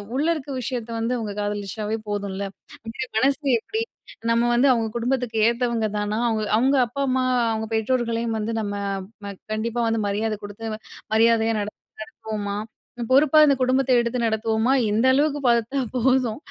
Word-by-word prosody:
உள்ள 285 +3 +1
இருக்கிற 285 -2 -6
விஷயத்த 240 -1 -4
வந்து 230 +2 0
அவங்க 215 -3 -4
காதலிச்சாவே 205 +1 -3
போதும்ல. 200 -1 -3 0.7
மனசு 270 +4 +2 0.2
எப்படி 440 - -3 0.5
நம்ம 235 +1 +2
வந்து 260 +3 +4
அவங்க 230 -2 0
குடும்பத்துக்கு 245 -1 -1
ஏத்தவங்க 235 -2 0
தானா, 210 +1 -1
அவங்க 220 -1 0
அவங்க 265 +4 +3
அப்பா, 280 +5 -5
அம்மா, 255 0 +1 0.3
அவங்க 220 0 -2
பெற்றோர்களையும் 230 0 0
வந்து 220 +2 -2
நம்ம 205 -1 -3 0.5
ம 200 - -5 0.2
கண்டிப்பா 230 +2 -2
வந்து 225 -1 0
மரியாதை 215 +2 -1
குடுத்து 215 +2 -6 0.4
மரியாதையா 225 0 +4
நடத்து 205 +1 -7 0.2
நடத்துவோமா, 205 -2 -5 0.5
பொறுப்பா 285 +3 +5
இந்த 280 -2 +4
குடும்பத்த 260 +1 +2
எடுத்து 235 +1 -1
நடத்துவோமா, 220 +2 +1 0.2
இந்த 220 +4 +2
அளவுக்கு 290 +1 +2
பார்த்தா 235 +3 +2 0.2
போதும். 250 -2 +2
230 Hz, 145 wpm, -23 LUFS, 215-255 Hz, 0.7 s, பொறுப்பா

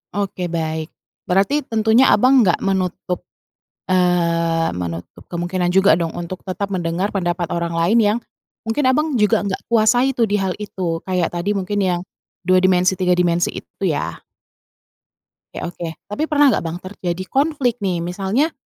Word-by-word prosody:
Oke 190 -3 -2
baik, 160 -1 -3 0.4
berarti 195 +11 +2
tentunya, 225 +3 +4
Abang, 255 +5 +5
nggak 175 -4 +1
menutup 185 -2 -2 0.6
eee, 170 - +1
menutup 85 -1 -6
kemungkinan 175 +1 -1
juga 195 +1 +5
dong 165 -1 -1
untuk 175 +1 -6
tetap 195 +1 -4
mendengar 175 +3 -2
pendapat 175 -2 -1
orang 170 0 -1
lain 170 +7 +2
yang, 210 +2 +2 0.5
mungkin, 225 +6 0
Abang, 300 +3 +1
juga 210 -2 +2
nggak 190 - -3
kuasai 235 +4 +4
tuh 240 -3 +1
di 205 - -2
hal 190 -2 0
itu 180 -5 -3
kayak 180 -3 0
tadi 175 +4 -1
mungkin 200 +1 -2
yang, 180 -3 +1 0.4
2 185 +1 +4
dimensi 185 0 +3
3 180 -1 +3
dimensi 175 0 +2
itu - - -5
ya. - - -3 1.3
Oke - - -4
oke 175 -1 -5 0.2
tapi 295 +9 -1
pernah 290 -3 +4
nggak, - - 0
Bang, 165 +1 -3
terjadi 185 -1 -4
konflik 270 -4 +1
nih 180 -4 -1
misalnya, 195 - 0
185 Hz, 155 wpm, -20 LUFS, 175-210 Hz, 1.3 s, Abang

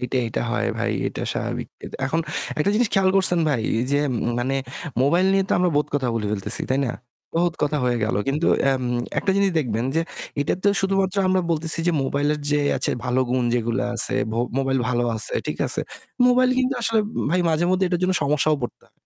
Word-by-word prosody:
এটা 125 +1 -2
এটা - - -3
হয় 120 - 0
ভাই। - - 0 0.2
এটা - - -6
স্বাভাবিক। - - -4 0.4
এখন 160 +5 0 0.4
একটা 175 +7 +2
জিনিস 230 0 +2
খেয়াল 190 -1 +4
করছেন 180 -2 +4
ভাই 125 -7 0 0.3
যে 145 - +3 0.4
মানে 130 +3 -1 0.5
মোবাইল 175 +7 +3
নিয়ে 195 0 +3
তো - - 0
আমরা 180 -1 +2
বহুত 150 - +2
কথা 130 -4 0
বলে 110 -2 -1
ফেলতেছি, 100 -2 -2
তাই 135 - +2
না? 120 - -1 0.4
বহুত 170 0 +1
কথা 150 +1 +1
হয়ে 120 -1 +1
গেল। 110 - -1
কিন্তু 150 +5 0 0.2
এম 130 -1 0 0.4
একটা 195 - 0
জিনিস 200 -1 +3
দেখবেন 115 -4 -1
যে - - +3 0.4
এটা 145 - +1
তো - - +5
শুধুমাত্র 195 0 0
আমরা 185 0 +3
বলতেছি 160 0 +2
যে 175 - +3
মোবাইলের 145 +2 0
যে 150 - +3 0.2
আছে 130 - -1
ভালো 125 +1 +1
গুণ 125 -1 +1
যেগুলা 120 0 0
আছে, - - +2 0.2
ভ - - -2 0.2
মোবাইল 135 0 +1
ভালো 120 -1 +1
আছে, 110 - +2
ঠিক - - -3
আছে। - - +2 0.5
মোবাইল 250 +1 +4
কিন্তু 260 +1 +1
আসলে 225 -1 +3 0.3
ভাই 180 +2 +2
মাঝেমধ্যে 175 +4 +2
এটার 175 -1 -1
জন্য 185 +1 +2
সমস্যাও 150 +1 +2
পড়তা 120 - -7
150 Hz, 195 wpm, -23 LUFS, 130-185 Hz, 0.5 s, তো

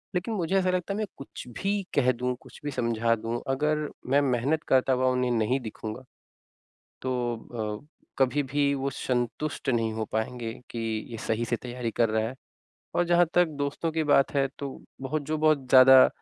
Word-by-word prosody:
लेकिन 185 +6 -1
मुझे 190 -2 -1
ऐसा 185 -1 +2
लगता 185 +2 -1
है - - -3
मैं 215 - 0
कुछ 135 -2 -9
भी 195 - 0 0.2
कह 130 -3 +4
दूँ 125 +1 -2
कुछ - - -14
भी 145 - -1
समझा 115 -2 +1
दूँ 115 +2 -4
अगर 150 +3 +1 0.2
मैं 140 +2 +4
मेहनत 135 +3 +1
करता 130 0 +4
हुआ 130 0 +2
उन्हें 125 -1 +1
नहीं 120 +3 +1
दिखूँगा, 110 0 -7 1.0
तो 120 -4 -3
अ, 145 - -22 0.3
कभी 135 +2 +3
भी 140 +1 +1
वो 135 0 -1
संतुष्ट 125 +4 -2
नहीं 115 -3 +1
हो 110 0 -2
पाएँगे 115 +1 -2 0.2
कि 120 - -5 0.3
ये 115 - -6
सही 115 +1 0
से 120 +1 -1
तैयारी 125 -1 -4
कर 115 +1 +2
रहा 110 0 +1
है। 125 - -7 0.6
और 175 - +3
जहाँ 175 0 +5
तक 180 0 +5
दोस्तों 145 +3 -1
की 160 0 0
बात 145 -2 +4
है 135 -1 +3
तो 140 - -3 0.3
बहुत 140 +3 -2
जो 155 - 0
बहुत 155 -3 +3
ज़्यादा 130 0 +9
130 Hz, 190 wpm, -27 LUFS, 120-145 Hz, 1.0 s, ज़्यादा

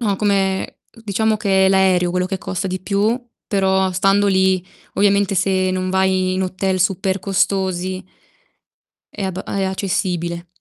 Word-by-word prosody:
No, 205 -4 0
come 195 -2 0
diciamo 220 -1 -1
che 195 -2 +2
è - - +4
l'aereo 190 -2 +3
quello 180 +1 0
che 190 0 -3
costa 185 +2 -4
di 185 0 -3
più, 205 +4 +1 0.3
però 190 -1 +1
stando 195 +2 +2
lì 190 -2 +2 0.3
ovviamente 200 0 +2
se 185 0 +1
non 185 0 -2
vai 190 0 +1
in 190 - -1
hotel 185 0 -1
super 190 +1 0
costosi 190 -1 -1 1.1
è 200 - -6
abba 190 0 -3
è 195 - -2
accessibile. 180 -3 -2
190 Hz, 145 wpm, -19 LUFS, 185-195 Hz, 1.1 s, è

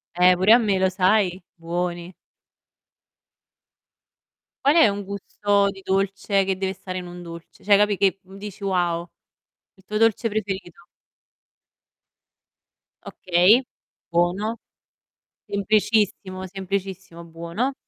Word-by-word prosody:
Eh, 180 +1 +5
pure 190 +5 +5
a 240 - +7
me, 205 -4 +1
lo 190 0 +3
sai? 185 -1 +1
Buoni. 175 +1 -4 2.5
Qual 285 +3 +5
è 325 - +7
un 200 0 -2
gusto 200 +1 0
di 195 -1 -13
dolce 195 +1 0
che 190 -1 -1
deve 190 0 -2
stare 185 -1 -6
in 180 - -8
un 175 0 -9
dolce, 170 -1 -12
cioè 205 0 +6
capi', 205 -1 +2
che 195 0 +1
dici: 195 +2 -10
"Wow." 175 -3 -1 0.6
Il 190 - -24
tuo 210 +2 -4
dolce 225 +1 +2
preferito. 195 -5 -5 2.2
Okay, 185 +8 +3 0.5
buono. 180 +7 0 0.9
Semplicissimo, 200 -2 0
semplicissimo, 190 -2 -5
buono. 170 +11 -3
190 Hz, 110 wpm, -23 LUFS, 180-205 Hz, 2.5 s, a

